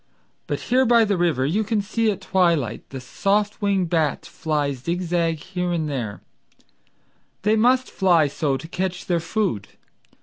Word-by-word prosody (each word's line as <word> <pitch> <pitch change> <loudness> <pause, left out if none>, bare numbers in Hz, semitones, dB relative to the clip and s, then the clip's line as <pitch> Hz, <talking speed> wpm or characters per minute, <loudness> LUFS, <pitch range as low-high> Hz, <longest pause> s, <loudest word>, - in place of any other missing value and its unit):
But - - -2
here 255 +2 +2
by 235 -2 +5
the 205 -1 +1
river 165 -7 +1
you 190 +10 +1
can 220 0 0
see 220 +2 0
at 195 -2 -2
twilight 170 - 0
The 135 - -6
soft 200 - -1
winged 195 -4 +1
bats 160 -4 0
fly 150 -3 -1
zig 170 +8 -3
zag 165 -2 0
here 180 +2 -3
and 165 -3 -1
there— 120 -8 -4 1.2
They 210 +2 +3
must 250 +3 +3
fly 175 -5 +3
so 140 -1 -1
to 140 - -9
catch 180 +1 -3
their 175 -2 +1
food. 165 - -2
175 Hz, 165 wpm, -23 LUFS, 155-205 Hz, 1.2 s, by